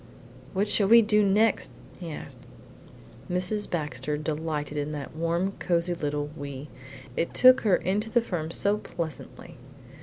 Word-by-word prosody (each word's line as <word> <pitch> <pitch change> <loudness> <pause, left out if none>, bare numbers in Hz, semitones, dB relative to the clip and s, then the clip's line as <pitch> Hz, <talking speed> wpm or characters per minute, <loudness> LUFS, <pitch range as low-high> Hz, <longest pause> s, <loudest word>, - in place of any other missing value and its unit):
"What 200 +2 +1
shall 205 -1 +3
we 230 +2 +8
do 210 0 +3
next?" 210 +3 +2 0.3
he 175 -3 -6
asked. - - -9 0.9
Mrs. 185 +4 -1
Baxter 150 -3 -3
delighted 150 -1 -3
in 145 +1 -2
that 145 -1 -7
warm, 170 +4 0
cosy 175 0 0
little 145 -2 -3
'WE;' 140 -1 -7 0.5
it 170 - -2
took 255 0 +7
her 205 -5 +4
into 205 +5 -1
the 240 - +3
firm 175 -9 -3
so 200 +5 +3
pleasantly. 165 -7 -7
170 Hz, 145 wpm, -27 LUFS, 150-205 Hz, 0.9 s, we